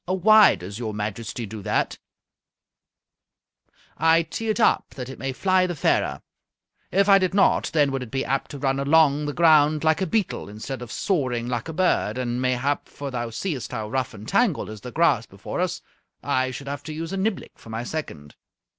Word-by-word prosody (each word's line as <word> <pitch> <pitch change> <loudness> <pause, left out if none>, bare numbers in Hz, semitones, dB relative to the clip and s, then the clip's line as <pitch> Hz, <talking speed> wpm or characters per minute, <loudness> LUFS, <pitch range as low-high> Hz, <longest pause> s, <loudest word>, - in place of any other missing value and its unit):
"Why 210 +4 +6
does 100 +5 -8
your 110 -3 -4
Majesty 110 +3 -4
do 105 0 -8
that?" - - -1 2.0
"I 165 +1 +4
tee 225 +7 -5
it 215 - 0
up 225 - +2
that 125 -1 -6
it 135 - -9
may 135 +2 -2
fly 185 +6 +2
the 175 - -4
fairer. 70 - 0 0.7
If 195 +2 +3
I 195 -1 +7
did 185 0 0
not, 200 - +3
then 145 -3 +3
would 135 -1 -2
it 125 - -7
be 135 +3 -2
apt 135 +1 -1
to 145 - -7
run 135 0 0
along 145 0 +3
the 145 - -3
ground 155 -2 +4
like 160 +2 +2
a 190 - 0
beetle 205 - -1
instead 115 +5 -6
of 120 -2 -8
soaring 130 - -1
like 120 +1 -3
a - - -5
bird, 155 - +1
and 125 -1 -2
mayhap, 130 +3 -1
for 140 -1 -7
thou 120 -2 -3
seest 130 - -4
how 110 -1 -4
rough 130 -2 -2
and 105 +1 -10
tangled 200 - +1
is 110 -2 -9
the 125 - -8
grass - - +2
before - - -7
us, - - -2 0.4
I 130 0 +1
should 140 +2 -8
have 140 0 -4
to 155 - -5
use 165 +3 -5
a - - -2
niblick 195 0 -3
for - - -14
my 110 +1 -4
second." 85 - -6
135 Hz, 200 wpm, -24 LUFS, 120-165 Hz, 2.0 s, I